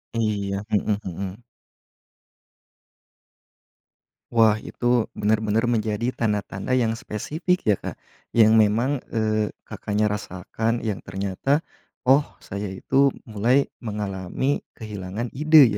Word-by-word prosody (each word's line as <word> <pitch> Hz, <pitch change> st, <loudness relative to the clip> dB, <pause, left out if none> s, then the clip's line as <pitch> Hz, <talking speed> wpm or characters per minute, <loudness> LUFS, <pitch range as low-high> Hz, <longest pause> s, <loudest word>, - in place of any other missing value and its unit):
Iya, 100 Hz, -3 st, -1 dB
mhm 105 Hz, -1 st, +1 dB
mhm. 95 Hz, +3 st, -5 dB, 2.9 s
Wah, 115 Hz, -2 st, +5 dB
itu 120 Hz, -2 st, 0 dB
benar-benar 110 Hz, +2 st, +1 dB
menjadi 110 Hz, -1 st, 0 dB
tanda-tanda 105 Hz, -1 st, -2 dB
yang 115 Hz, -3 st, +2 dB
spesifik 150 Hz, -, -1 dB
ya 105 Hz, -, +5 dB
Kak, -, -, -7 dB, 0.3 s
yang 110 Hz, -1 st, +6 dB
memang, 115 Hz, +6 st, +3 dB
eee, 110 Hz, -1 st, +1 dB, 0.2 s
Kakaknya 105 Hz, +1 st, 0 dB
rasakan 105 Hz, +3 st, -2 dB
yang 105 Hz, -4 st, -2 dB
ternyata, 100 Hz, +10 st, 0 dB, 0.5 s
"Oh 135 Hz, +3 st, +6 dB, 0.2 s
saya 100 Hz, +1 st, -4 dB
itu 135 Hz, +8 st, +3 dB, 0.2 s
mulai 120 Hz, +6 st, +2 dB, 0.2 s
mengalami 105 Hz, +4 st, -2 dB, 0.2 s
kehilangan 105 Hz, +1 st, -5 dB
ide 155 Hz, +2 st, +8 dB
110 Hz, 100 wpm, -24 LUFS, 105-120 Hz, 2.9 s, ide